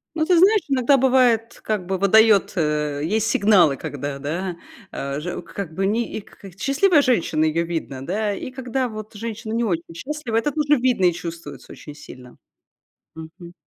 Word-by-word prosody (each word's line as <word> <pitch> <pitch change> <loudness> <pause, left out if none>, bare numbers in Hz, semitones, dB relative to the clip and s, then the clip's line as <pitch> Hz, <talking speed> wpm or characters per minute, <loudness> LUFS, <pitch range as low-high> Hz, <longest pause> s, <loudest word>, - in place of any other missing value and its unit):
Ну, 315 - +1
ты 360 -2 +4
знаешь, 410 +4 +5
иногда 270 0 +3
бывает, 245 -3 +2
как 205 -5 -2
бы 190 - -1
выдает 210 +2 +4
э, 150 -3 -1
есть 215 +6 0
сигналы, 195 -10 +4
когда, 140 0 -5
да, 170 +5 -4 0.3
а 140 +1 -4
же 175 +4 -5
как 170 0 -7
бы, 195 +3 -1
ни 225 +3 0
и - - -5
к - - -21
к 195 -1 -14
Счастливая 300 +4 +3
женщина- 175 - +1
ее 160 +2 0
видно, 160 -6 -5
да. 205 +5 -1
И 255 - -7
когда 255 0 -3
вот 215 -1 -9
женщина 225 +1 -6
не 235 - 0
очень 170 -5 -3
счастлива- 270 - -5
это 290 +6 0
тоже 295 -1 +2
видно 245 -6 +2
и 175 - +4
чувствуется 165 -5 -8
очень 150 - -11
сильно. 125 -4 -13 0.8
Мгм. 170 +2 -11
200 Hz, 180 wpm, -22 LUFS, 165-245 Hz, 0.8 s, знаешь